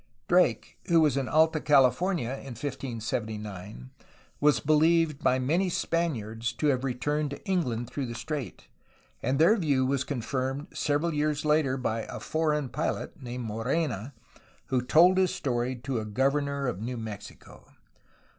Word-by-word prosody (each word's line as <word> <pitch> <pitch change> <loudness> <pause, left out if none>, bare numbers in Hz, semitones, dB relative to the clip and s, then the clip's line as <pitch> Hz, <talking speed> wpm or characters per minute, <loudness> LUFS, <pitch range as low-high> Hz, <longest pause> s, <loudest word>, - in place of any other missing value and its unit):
Drake, 180 +1 +2
who 170 -1 +5
was 150 -5 +3
in 135 -2 -1
Alta 160 0 +3
California 145 +1 +3
in 135 -2 -7
1579, 110 - -5 0.5
was 145 -5 +4
believed 155 +2 +3
by 130 - +3
many 165 +9 +1
Spaniards 115 -11 -1
to 150 +5 0
have 130 -2 +1
returned 145 +4 -1
to 140 - -9
England 125 -11 0
through 135 +1 -4
the 120 - -6
strait, 150 -1 -5 0.5
and 130 +1 0
their 165 +9 +6
view 145 - +1
was 135 0 0
confirmed 135 +2 -3
several 150 +3 0
years 150 0 0
later 150 -3 +2
by 115 -3 -2
'^a - - -6
foreign 150 -3 0
pilot'' 130 - -3
named 125 -1 -5
Morena, 120 - -2 0.5
who 130 -2 +2
told 175 +9 +5
his 185 -2 +2
story 125 -1 -1
to 125 0 -3
a 110 - -4
governor 140 +5 0
of 115 -6 -2
New 125 +2 -4
Mexico. 110 -3 -9
135 Hz, 145 wpm, -28 LUFS, 120-155 Hz, 0.5 s, their